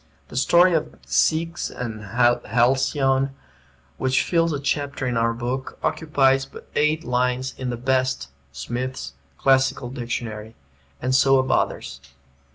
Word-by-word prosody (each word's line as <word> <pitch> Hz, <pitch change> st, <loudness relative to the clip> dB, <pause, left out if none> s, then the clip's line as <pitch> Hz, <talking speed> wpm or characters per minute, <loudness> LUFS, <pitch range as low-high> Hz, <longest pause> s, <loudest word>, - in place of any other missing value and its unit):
The -, -, -11 dB
story 175 Hz, +7 st, +5 dB
of 155 Hz, -1 st, -1 dB
Ceyx 165 Hz, +1 st, +1 dB
and 115 Hz, -3 st, -6 dB
Halcyone, 125 Hz, +4 st, +2 dB, 0.6 s
which 130 Hz, 0 st, +1 dB
fills 165 Hz, -1 st, +1 dB
a 145 Hz, -, -2 dB
chapter 140 Hz, -1 st, -2 dB
in 125 Hz, -1 st, -1 dB
our 115 Hz, 0 st, +2 dB
book, 125 Hz, +3 st, -4 dB
occupies 135 Hz, -4 st, +2 dB
but -, -, -13 dB
eight 150 Hz, +2 st, +2 dB
lines 125 Hz, 0 st, 0 dB
in 130 Hz, -1 st, -4 dB
the 120 Hz, -, -3 dB
best 130 Hz, -, 0 dB, 0.2 s
(Smith's) 120 Hz, -, -5 dB, 0.2 s
Classical 130 Hz, -2 st, +2 dB
Dictionary; 115 Hz, -3 st, -5 dB, 0.5 s
and 130 Hz, +1 st, 0 dB
so 135 Hz, 0 st, +5 dB
of 130 Hz, 0 st, +1 dB
others. 70 Hz, 0 st, -1 dB
130 Hz, 130 wpm, -23 LUFS, 120-135 Hz, 0.6 s, story